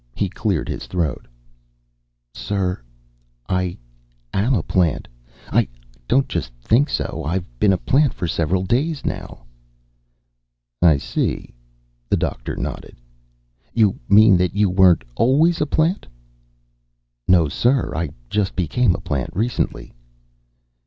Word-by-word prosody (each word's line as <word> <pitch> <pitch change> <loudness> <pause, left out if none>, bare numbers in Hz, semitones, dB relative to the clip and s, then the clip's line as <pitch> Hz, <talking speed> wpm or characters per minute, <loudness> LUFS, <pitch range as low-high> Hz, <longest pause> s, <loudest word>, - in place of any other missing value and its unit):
He - - -1
cleared - - -1
his - - -5
throat. 85 -6 -2 1.1
"Sir, 95 -7 -2 0.7
I 90 -1 -1 0.6
am 110 +7 +2
a 90 - 0
plant, 85 -4 0 0.4
I - - +3 0.4
don't 135 +1 +3
just 85 - -3
think 120 - +2
so. - - -3
I've 85 +5 -2
been 100 - +4
a 95 - +2
plant 140 +6 +2
for 90 - -3
several 85 +3 0
days, 140 - -1
now." - - -5 1.4
"I 80 -4 +6
see." 70 - -3 0.6
The - - +2
Doctor - - -3
nodded. - - -6 0.8
"You 110 -4 +3
mean 105 -2 +7
that 90 +1 0
you 100 -2 +2
weren't 90 -6 +5
always 150 - +3
a 150 - +1
plant?" 160 +6 0 1.2
"No, 85 -4 +5
sir. 125 - +1
I 85 -1 -2 0.2
just 100 +2 -1
became 90 +4 +1
a - - -7
plant 70 -4 -2
recently." 115 +5 -2
95 Hz, 125 wpm, -21 LUFS, 85-125 Hz, 1.4 s, mean